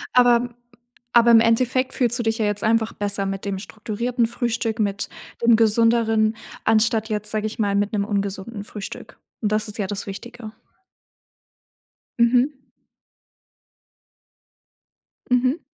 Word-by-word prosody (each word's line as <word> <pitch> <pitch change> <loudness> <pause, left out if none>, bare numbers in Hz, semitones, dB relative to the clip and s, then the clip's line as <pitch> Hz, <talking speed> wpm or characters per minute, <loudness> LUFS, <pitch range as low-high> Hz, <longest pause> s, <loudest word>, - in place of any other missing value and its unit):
Aber 245 -1 +6
m 240 0 -5 0.6
aber 235 0 +6
im 225 - +8
Endeffekt 255 +3 +2
fühlst 240 -1 +1
du - - 0
dich 225 0 -1
ja 215 - +1
jetzt 205 -1 -1
einfach 220 0 +2
besser 200 -1 -2
mit 195 0 -4
dem 195 -1 -2
strukturierten 230 +4 -2
Frühstück, 230 -1 -2
mit 205 -1 -1 0.3
dem 235 -1 +5
Gesünderen, 225 0 +3 0.3
anstatt 220 0 +2
jetzt, 210 -1 -2
sage 215 0 -1
ich 220 - -8
mal, 205 -2 0
mit 205 +2 0
'nem 200 -1 +1
ungesunden 200 +1 -3
Frühstück 210 -2 -9 0.2
und 210 - 0
das 215 0 0
ist 205 - -4
ja 200 -3 -2
das 205 0 -4
Wichtige. 225 +3 -8 1.7
Mhm. 245 +4 +4 2.8
Mhm. 255 +5 +2
220 Hz, 135 wpm, -22 LUFS, 205-235 Hz, 2.8 s, im